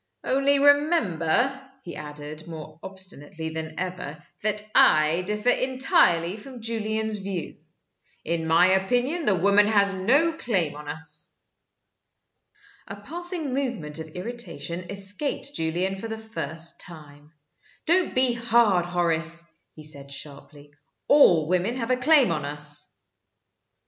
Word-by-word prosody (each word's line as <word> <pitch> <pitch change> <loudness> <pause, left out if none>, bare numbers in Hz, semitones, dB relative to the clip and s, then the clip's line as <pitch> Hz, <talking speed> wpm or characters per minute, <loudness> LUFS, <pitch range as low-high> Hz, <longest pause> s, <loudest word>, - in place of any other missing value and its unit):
Only 275 +2 +2
remember," 270 - +3 0.2
he 170 - -8
added, 150 +1 -9
more 155 -1 -9
obstinately 180 -5 -6
than 160 0 -6
ever, 180 -5 -5 0.2
"that 210 0 -1
I 155 +3 +5
differ 210 +3 0
entirely 220 -10 +2
from 250 +3 -11
Julian's 220 -1 -2
view. 190 -4 -5 0.7
In 165 0 -2
my 170 +3 +5
opinion 245 - +1
the 200 - +4
woman 200 +3 +4
has 200 -2 +3
no 270 - +2
claim 190 - -1
on 150 0 -10
us." 160 +2 -2 1.5
A 200 - -7
passing 325 - -2
movement 235 - -3
of 160 - -6
irritation 180 -5 -6
escaped 205 +8 -1
Julian 175 - -1
for 195 +4 -6
the 220 0 -5
first 170 -7 -4
time. 150 -3 -12 0.5
"Don't 355 +2 +2
be 255 -1 +3
hard, 230 -6 +2
Horace," 170 -1 -1 0.2
he 155 - -11
said, 140 -2 -5
sharply. 145 +1 -10 0.3
"All 175 - +6
women 185 +7 0
have 245 -1 -2
a - - +4
claim 260 - +4
on 155 -3 -2
us." 145 +1 -2
190 Hz, 125 wpm, -25 LUFS, 160-240 Hz, 1.5 s, All